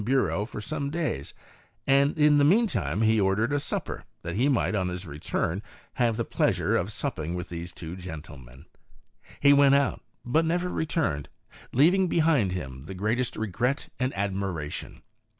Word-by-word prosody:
Bureau 105 -6 +1
for - - -7
some 140 +5 -3
days, 155 - -3 0.5
and 140 +2 +3
in 150 -1 +5
the - - +4
mean 200 +11 +5
time 100 - -1
he 110 -1 +4
ordered 100 +7 +1
a 145 - +2
supper, - - -3 0.2
that 85 0 -4
he 130 +7 +2
might, 115 -8 +1
on 95 -3 0
his 90 +1 -5
return, 80 +4 -2 0.3
have 115 -3 +1
the 115 - -1
plea - - +2
sure - - 0
of 90 +5 0
supping 90 - -3
with 90 -1 -5
these 85 0 -6
two 85 0 -7
gentlemen. 75 -7 -10 0.7
He 140 0 +6
went 140 -1 +6
out, 140 -1 +1 0.2
but 155 +7 +2
never 175 +2 0
returned, 150 - -1 0.4
leaving 180 +8 +4
behind 155 - +3
him 65 -6 -6
the 95 - -7
greatest 115 +6 -1
regret 115 +6 -1
and 130 0 +1
admiration. 95 -6 -3
110 Hz, 170 wpm, -27 LUFS, 90-140 Hz, 0.7 s, He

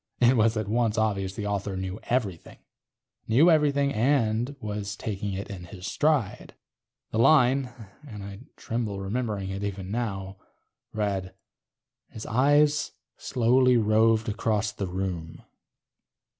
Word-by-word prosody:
It 125 +1 +5
was 110 -1 +3
at 110 -2 -2
once 115 0 +1
obvious 100 -3 0
the 105 - -4
author 100 -1 -2
knew 95 +2 -4
everything. 105 -9 -2 0.7
Knew 145 +10 +5
everything 140 -3 +2
and 120 +1 +1
was 105 -3 -4
taking 100 -2 -4
it 100 +2 -5
in 90 -3 -8
his 90 +1 -10
stride. 145 -4 0 0.6
The 110 - -1
line 130 0 +4 0.4
(and 105 -6 -8
I 100 0 -8 0.2
tremble 115 -4 -3
remembering 100 -1 -3
it 100 +1 -5
even 100 -1 -4
now) 100 -5 -3 0.5
read: 95 -3 -2 0.7
_... - - -36
his 110 - -7
eyes 145 +5 +3 0.2
slowly 125 0 +3
roved 110 0 +3
about 105 -1 -1
the 100 - -2
room. 90 -3 -5
110 Hz, 130 wpm, -26 LUFS, 100-120 Hz, 0.7 s, It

